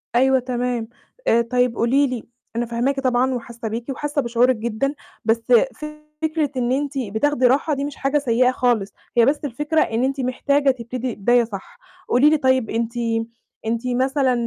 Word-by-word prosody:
أيوه 265 +1 +4
تمام. 245 -2 -2 0.4
آآ 235 +1 +5
طيب 245 0 +1
قولي 270 +5 +3
لي 250 -3 -4 0.3
أنا 240 +1 0
فاهماكِ 245 +4 -1
طبعًا 255 0 +1
وحاسة 235 -1 -6
بيكِ 230 +4 -5
وحاسة 290 +2 -1
بشعورِك 245 +1 +2
جدًا، 235 +5 -2 0.3
بس 225 +1 +2 0.8
فكرة 310 -2 0
إن 245 0 0
أنتِ 285 +2 -1
بتاخدي 255 +3 +1
راحة 290 +4 +2
دي 280 +1 -2
مش 290 - -6
حاجة 275 +2 0
سيئة 250 -2 +2
خالص، 235 -6 0 0.2
هي 235 - +6
بس 285 +3 +2
الفكرة 295 +5 0
إن 225 +3 0
أنتِ 270 +1 -1
محتاجة 275 +2 +2
تبتدي 245 0 -5
بداية 240 +4 +3
صح. 200 -4 -9 0.3
قولي 275 +5 +5
لي 310 - +3
طيب 260 -4 +2
أنتِ 230 +1 -2 0.7
أنتِ 230 +2 -2
مثلًا 260 +1 +1
250 Hz, 165 wpm, -21 LUFS, 235-275 Hz, 0.8 s, هي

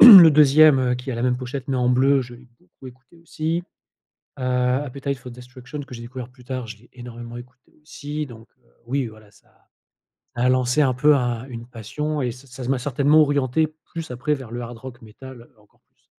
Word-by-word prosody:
Le 190 -9 +12
2e 150 0 +6
heu, 125 -1 +1
qui 125 +2 -6
a - - -3
la 115 - -3
même 125 -1 +1
pochette 130 +1 -6
mais 135 - 0
en 125 -1 +1
bleu, 135 +2 +3
je 120 0 -11
l'ai 125 +1 -17
beaucoup 90 +9 -17
écouté 130 +6 -16
aussi. 165 +1 -3 0.8
Heu, 130 - -4
Appetite 130 +2 -1
for 125 0 -10
Destruction 125 +3 -10
que 135 - -11
j'ai 115 - -8
découvert 125 +1 -8
plus 125 -1 -19
tard, 130 -1 -5
je 110 0 -9
l'ai 120 +3 -23
énormément 120 -1 -9
écouté 125 +1 -15
aussi 150 0 -6
donc 115 -2 -13
heu, 115 - -33 0.2
oui, 130 0 -1
voilà, 110 -1 -15
ça - - -26 0.9
ça 120 - -1
a 125 - +4
lancé 130 +3 +2
un 130 -3 +3
peu 150 +4 +4
un 120 -2 -1
une 115 -2 -8
passion 145 +6 -4
et 125 -2 -1
ça 135 +2 -16
ça 125 0 -7
m'a 135 - +2
certainement 145 +4 +3
orienté 145 +2 +1
plus 165 -5 -7
après 125 +5 -1
vers 130 -5 -7
le 120 +1 -5
hard 120 0 -8
rock 120 0 -11
métal 120 +2 -12
encore 105 -1 -28
plus. - - -42
125 Hz, 215 wpm, -22 LUFS, 120-140 Hz, 0.9 s, Le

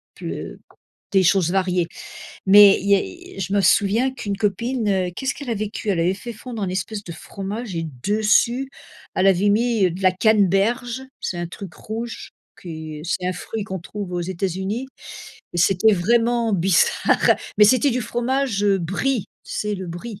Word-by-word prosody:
ple - - -7 0.5
des 190 -2 +4
choses 175 -1 +3
variées. 180 -3 +1 0.6
Mais 200 0 +8
il 200 - -3 0.5
y 195 - -6
je 190 +1 -3
me 200 - +3
souviens 210 +7 +3
qu'une 205 -5 -4
copine, 205 -3 -1
qu'est-ce 265 +6 -2
qu'elle 275 -3 -7
avait 215 -2 -2
cuit? 215 -1 -3
Elle 180 - 0
avait 175 +3 +2
fait 235 +5 -8
fondre 230 -1 -7
un 190 - -1
espèce 195 +3 -3
de - - -9
fromage 200 +5 -6
et 165 - -2 0.2
dessus, 220 +5 +2 0.5
elle 185 - +3
avait 195 +2 +4
mis 215 -3 +2
de 180 +3 -7
la 185 - +5
canneberge, 220 +5 +2 0.2
c'est 175 - -3
un 175 - -3
truc 180 -1 -9
rouge 230 +2 -6 0.3
que 180 - -12 0.4
c'est 180 +1 -2
un 185 - 0
fruit 215 +3 -5
qu'on 190 -2 -5
trouve 195 +1 -7
aux 175 - -1
États-Unis 190 +6 -3 0.7
et 175 - -3
c'était 195 +5 +4
vraiment 230 +4 +1
bizarre, 180 0 +3 0.2
mais 210 - +8
c'était 255 +6 +4
du 250 - -1
fromage, 240 -1 -1
heu, 200 -1 +3
brie, 200 +7 -1 0.2
tu - - -9
sais, 210 0 -2
le 190 -1 -6
brie. 195 +5 -7
200 Hz, 170 wpm, -22 LUFS, 185-230 Hz, 0.7 s, Mais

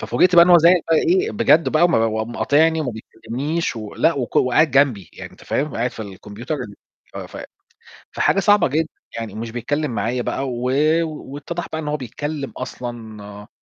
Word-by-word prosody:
ففوجئت 180 0 +2
بقى 170 0 +9
إنه 180 - +4
هو 175 - +9
زعِل 170 +2 +5
بقى 165 - +5
إيه 375 - +2
بجد 160 - +3
بقى، 155 +2 +3
وم 175 - +3
وقام 110 0 0
مقاطعني 160 +6 +2
وما 140 -5 -2
بيكلّمنيش 125 +8 -4
و 110 -2 -7
لأ، 165 - +3
وك 130 -4 -4
وقاعد 145 +5 +3
جنبي، 130 - +2
يعني - - -10
أنت - - -17
فاهم، 145 +1 -2
قاعد 120 +2 -1
في 110 - -8
الكمبيوتر 105 - -7
ال 105 -8 -7 0.4
ف - - -11 0.2
ف - - -7 0.7
فحاجة - - +1
صعبة 205 0 +4
جدًا 155 +4 0 0.3
يعني 115 -3 -5
ومش 115 +2 -6
بيتكلم 140 +5 -2
معايا 120 +2 -2
بقى، 135 +2 -3
و 120 -1 -5 0.4
واتّضَح 155 +2 -6
بقى 160 - -3
إن 150 - -6
هو 150 0 -1
بيتكلم 140 +3 -5
أصلًا 110 -5 -8
135 Hz, 190 wpm, -20 LUFS, 115-160 Hz, 0.7 s, بقى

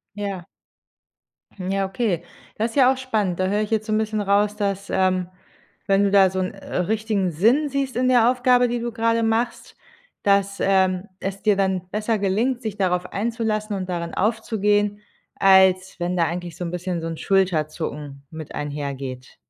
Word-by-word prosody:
Ja. 200 -4 -4 1.1
Hm, 185 -2 -6
ja, 195 0 0
okay. 195 -3 -1 0.3
Das 225 +2 -1
ist - - -14
ja 260 -1 +6
auch 265 - -2
spannend. 215 -9 -1
Da 185 - +1
höre 205 +2 +1
ich 210 - -3
jetzt 220 -1 0
so 215 - 0
'n - - +3
bisschen 215 -1 -1
raus, 205 +1 +2
dass, 200 -1 -2
ähm, 185 -1 +1 0.6
wenn 195 0 +3
du 200 - +2
da 195 -2 +6
so 190 - -3
'n, 185 0 -2
äh, 195 - -6
richtigen 205 0 0
Sinn 235 - +3
siehst 275 -1 -2
in 255 +1 +1
der 245 -2 +5
Aufgabe, 250 0 +3
die 240 0 -2
du 235 0 -3
grade 230 0 +1
machst, 225 +2 -1 0.5
dass, 200 0 +2
ähm, 190 0 +2
es 195 +1 -5
dir 210 -2 +4
dann 190 -2 0
besser 215 +2 -1
gelingt, 225 +6 0
dich 215 -2 -4
darauf 180 -2 0
einzulassen 215 -1 -1
und 190 -1 -4
darin 170 -1 -3
aufzugehen, 210 -1 0 0.3
als 190 -1 +4
wenn 175 +1 -1
da 170 - +3
eigentlich 170 0 -5
so 180 - -4
'n 170 - -4
bisschen 180 -1 -3
so 165 - -4
'n 165 -1 -5
Schulterzucken 155 -6 -1
mit 160 -2 -8
einhergeht. 140 -3 -5
200 Hz, 185 wpm, -23 LUFS, 180-220 Hz, 1.1 s, ja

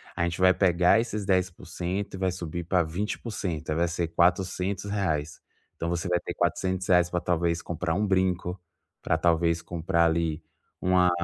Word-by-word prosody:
a 85 - 0
gente 85 0 -2
vai 95 0 +6
pegar 90 +2 +4
esses 110 -3 -3
10% 90 +1 -2
e - - -6
vai 95 -1 0
subir 85 -1 -5
pra 90 0 +2
20%. 90 -1 -4
Aí, - - 0
vai 85 +2 +2
ser 85 0 -2
R$400. 90 -1 0 0.4
Então 85 - -3
você 85 -1 -2
vai 90 0 +2
ter 90 - -6
R$400, 90 0 +1
pra 90 - -1
talvez 85 -1 0
comprar 85 -1 -2
um 105 +3 +1
brinco, 95 -1 0 0.4
pra 80 - +1
talvez 85 0 +2
comprar 85 -1 +1
ali 80 -1 0 0.4
uma 90 -1 +4
90 Hz, 160 wpm, -27 LUFS, 85-95 Hz, 0.4 s, vai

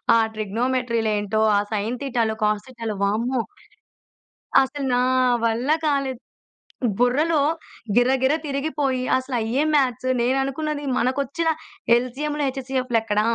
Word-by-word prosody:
ఆ - - +6 0.2
ట్రిగ్నోమెట్రీ‌లేంటో, 220 -1 0 0.2
ఆ - - +4
sign 215 +4 -1
థీటాలు, 235 -5 0
cos 210 -1 +1
థీటాలు, 230 -4 -5
వామ్మో! 230 +5 0 1.2
అసలు 270 +1 -2
నా 245 - +3 0.4
వల్ల 230 +4 0 0.2
కాలేదు. 275 -4 0 0.8
బుర్రలో 290 +6 +3 0.6
గిర 245 +1 +5
గిర 265 +3 +4
తిరిగిపోయి, 275 -2 -1
అసలయ్యే 255 0 -1
మ్యాథ్స్. 255 -3 +1
నేననుకున్నది, 275 +4 -1
మనకొచ్చిన 280 +6 0 0.5
ఎల్‌సీఎం‌లు, 290 +5 -2
హెచ్‌సీఎఫ్‌లు 260 -2 -1
ఎక్కడ? 210 -2 0
255 Hz, 105 wpm, -23 LUFS, 230-275 Hz, 1.2 s, ఆ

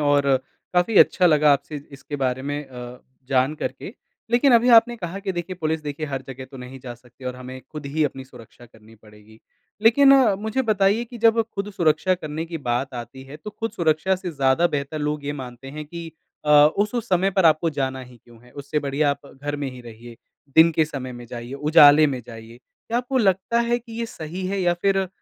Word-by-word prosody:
और 145 -2 +3 0.4
काफ़ी 180 +5 +2
अच्छा 180 - +5
लगा 150 -3 +5
आपसे 145 +2 -2 0.2
इसके 140 +2 -7
बारे 130 -1 -1
में 145 +1 -3
अ, 125 -1 -10 0.3
जान 135 +2 +2
करके। 135 - -6 0.4
लेकिन 245 +3 +4
अभी 235 +1 +4
आपने 235 +1 +4
कहा 185 -2 -6
कि 195 -1 -3
देखिए 175 +1 -5
पुलिस 160 0 -1
देखिए 150 +1 -5
हर 135 -2 -4
जगह 130 0 -8
तो 135 - -11
नहीं 125 +1 -9
जा 125 -1 -8
सकती 125 +2 -19
और 125 0 -4
हमें 130 +1 -9
खुद 150 -2 -7
ही 150 +2 0
अपनी 135 -2 -4
सुरक्षा 120 -2 -16
करनी 110 -1 -19
पड़ेगी। 105 0 -19 0.4
लेकिन 270 +5 +6 0.3
मुझे 220 +5 -1
बताइए 210 0 +2
कि 240 0 -11
जब 230 0 +4
खुद 200 +1 -4
सुरक्षा 170 +1 +2
करने 155 -2 -5
की 165 0 -6
बात 130 0 -2
आती 125 +2 -8
है, 135 +2 -10
तो 210 +7 -9
खुद 225 +2 -5
सुरक्षा 165 +3 +1
से 185 -1 -6
ज़्यादा 140 +2 +2
बेहतर 145 -1 -3
लोग 150 0 -3
ये 145 - -2
मानते 130 -1 -9
हैं 150 +1 -7
कि 165 +1 -8 0.3
अ, 150 - 0
उस-उस 205 +11 +3
समय 185 +1 +2
पर 190 -1 +1
आपको 160 +1 +3
जाना 130 -2 -3
ही 125 -1 -13
क्यों 120 -1 -18
है, 125 - -18
उससे 140 +1 -3
बढ़िया 145 +1 0
आप 140 0 -6
घर 145 +2 -5
में 140 -2 -4
ही 125 - -11
रहिए, 120 0 -12 0.4
दिन 165 +1 +8
के 160 0 +2
समय 135 -4 -6
में 120 0 -10
जाइए, 120 +2 -8
उजाले 150 +1 +6
में 130 -4 -3
जाइए, 115 0 -11
क्या 225 - -6
आपको 255 +2 -1
लगता 195 +2 +1
है 235 0 +1
कि 235 -1 -14
ये 230 - -2
सही 180 -1 -6
है 195 +1 -2
या 175 -1 +2
फिर 195 -1 +2
150 Hz, 215 wpm, -23 LUFS, 130-185 Hz, 0.4 s, दिन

